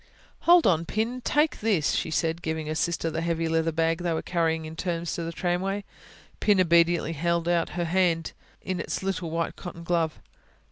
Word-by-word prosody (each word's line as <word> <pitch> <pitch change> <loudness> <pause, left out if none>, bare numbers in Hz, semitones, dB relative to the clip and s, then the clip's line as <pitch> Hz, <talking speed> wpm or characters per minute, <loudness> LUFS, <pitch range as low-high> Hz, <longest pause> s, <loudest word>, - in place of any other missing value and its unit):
"Hold 350 -1 +8
on, 165 -2 +3
Pin... 230 +6 -2
take 295 +4 +2
this," 200 -9 +1
she - - -1
said, 165 +1 0
giving 160 -1 -3
her 155 - -2
sister 165 0 -1
the 165 +1 -2
heavy 165 -1 -1
leather 165 0 +1
bag 165 +1 +1
they 175 -1 -1
were 160 - -2
carrying 165 -2 0
in 155 +1 -8
turns 170 -1 -2
to - - -3
the 165 - -4
tramway. 190 +4 -1 0.6
Pin 205 -2 +3
obediently 170 -1 +3
held 170 +2 0
out 170 -1 +1
her 175 - 0
hand, 170 -1 +1 0.3
in 185 -2 -3
its 170 - -3
little 185 -3 -2
white 165 +1 -2
cotton 170 -2 -8
glove. 165 -2 0
170 Hz, 190 wpm, -26 LUFS, 165-180 Hz, 0.6 s, Hold